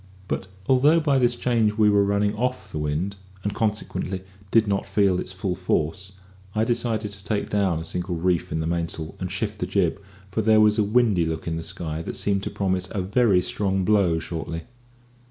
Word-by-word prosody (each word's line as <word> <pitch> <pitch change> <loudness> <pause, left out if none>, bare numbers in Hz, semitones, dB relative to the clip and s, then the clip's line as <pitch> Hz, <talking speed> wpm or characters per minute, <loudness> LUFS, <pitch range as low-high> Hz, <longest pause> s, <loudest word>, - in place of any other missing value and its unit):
But 95 - -3 0.2
although 145 +5 +5
by 145 -4 +2
this 120 -1 +3
change 115 -3 +2
we 105 0 +3
were 100 -1 +5
running 100 +1 +1
off 125 +3 -2
the 75 - -3
wind, 75 +7 -2 0.3
and 105 - -1
consequently 100 -3 -2 0.3
did 110 0 +4
not 100 -1 0
feel 100 -2 +2
its 90 - -5
full 95 0 -2
force, 90 +3 -1 0.4
I 110 - +2
decided 115 -2 0
to 100 -1 -13
take 105 0 -2
down 100 -5 +2
a 80 - -5
single 90 +1 -3
reef 85 0 0
in 80 - -1
the - - -2
mainsail, 85 -1 -2
and 90 -1 -4
shift 105 +1 -3
the - - -2
jib; 95 -1 +1 0.3
for 110 - 0
there 110 0 +5
was 105 0 +4
a - - +5
windy 105 -5 +3
look 80 0 -4
in 80 0 -1
the 80 - -4
sky 80 -3 -4
that - - -5
seemed 100 -1 +1
to - - -3
promise 95 -1 -1
a 100 - -2
very 100 -1 +3
strong 95 -1 0
blow 100 -6 +3
shortly. 80 0 -4
100 Hz, 205 wpm, -24 LUFS, 90-110 Hz, 0.4 s, although